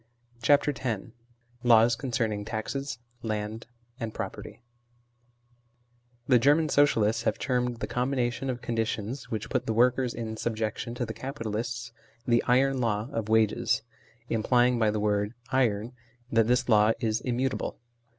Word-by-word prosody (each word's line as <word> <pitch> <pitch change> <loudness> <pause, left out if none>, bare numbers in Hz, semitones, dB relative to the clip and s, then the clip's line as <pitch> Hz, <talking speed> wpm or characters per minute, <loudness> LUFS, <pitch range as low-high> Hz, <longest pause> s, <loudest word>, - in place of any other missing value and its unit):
CHAPTEK 145 +3 +3
X 110 -6 -1 0.6
LAWS 115 -1 +5
CONCERNING 115 -5 -2
TAXES, 115 +4 -4 0.2
LAND, 110 0 -4 0.3
AND 115 -2 -4
PEOPEETY - - -6 1.6
THE 125 -3 +5
German 150 +5 +4
Socialists 115 -7 +3
have - - 0
termed 125 -2 -1
the - - -2
combina 125 -1 0
tion 135 +2 -5
of 125 -1 -4
conditions 115 +1 -2
which 110 0 -4
put 125 -2 -1
the 110 - 0
workers 125 +1 +3
in 110 -1 -5
subjection 115 +1 -3
to 120 - -2
the 110 - -5
capitalists, 115 -2 -4 0.3
the 120 -1 +3
iron 130 +2 +3
law 110 0 0
of 115 -4 -3
wages, 110 0 +2 0.4
implying 120 +2 +2
by 110 -2 +3
the 105 0 -1
word 105 +1 0
" - - -24
iron 120 -3 +1 0.2
" 125 0 -33
that 115 -1 +3
this 125 +1 +2
law 110 -1 +5
is 110 -2 0
immutable. 130 +1 -2
115 Hz, 145 wpm, -28 LUFS, 110-125 Hz, 1.6 s, LAWS